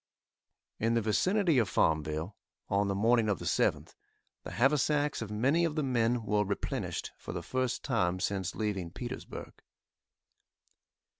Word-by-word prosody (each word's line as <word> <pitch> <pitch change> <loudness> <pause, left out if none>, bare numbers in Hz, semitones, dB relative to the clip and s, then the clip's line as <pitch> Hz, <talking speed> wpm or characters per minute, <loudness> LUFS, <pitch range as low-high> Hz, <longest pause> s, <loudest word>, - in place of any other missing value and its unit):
In 115 +1 +1
the 115 - +3
vicinity 170 - +2
of 110 - +1
Farmville, 80 +4 0 0.3
on 100 +1 +2
the 100 - 0
morning 115 +2 +3
of 100 - +1
the - - -8
7th, - - +1 0.5
the - - -8
haversacks 145 +2 +2
of 110 - -4
many 130 +11 +2
of 165 -3 0
the 155 - 0
men 120 -2 +1
were 105 0 +2
replenished 100 0 -3
for - - -7
the - - -4
first 130 -1 -1
time 95 -8 0
since 95 -1 -2
leaving 100 -6 -2
Petersburg. - - -7
115 Hz, 145 wpm, -31 LUFS, 100-130 Hz, 0.5 s, the